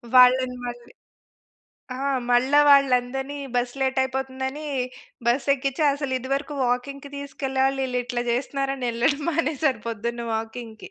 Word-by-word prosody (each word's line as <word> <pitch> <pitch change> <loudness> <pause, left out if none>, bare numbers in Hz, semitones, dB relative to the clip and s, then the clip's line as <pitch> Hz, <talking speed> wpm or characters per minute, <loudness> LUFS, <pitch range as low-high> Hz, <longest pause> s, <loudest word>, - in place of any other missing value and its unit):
వాళ్ళని 250 0 +6
మళ్ళీ 240 0 -8 1.0
ఆ! - - -6 0.3
మళ్ళా 260 +4 +5
వాళ్ళందరిని 270 0 +3 0.2
బస్ 245 +1 0
లేట్ 265 0 +1
అయిపోతుందని, 265 +2 -3 0.6
బస్ 255 +4 +1
ఎక్కించి 275 +2 -2
అసలు 280 -2 -3
ఇది 260 +1 -8
వరకు 290 +1 -3
వాకింగ్‌కి 275 +3 -2
తీసుకెళ్ళాలి 270 -1 -1
వీళ్ళు 250 -1 -1
ఇట్లా 240 0 -2
చేస్తున్నారు 275 +2 -1
అనే 255 -2 -3
వెళ్ళడం 275 +6 +1
మానేశాను 300 -6 0
పొద్దున్న 235 +1 -3
వాకింగ్‌కి. 225 0 -6
260 Hz, 125 wpm, -24 LUFS, 245-275 Hz, 1.0 s, వాళ్ళని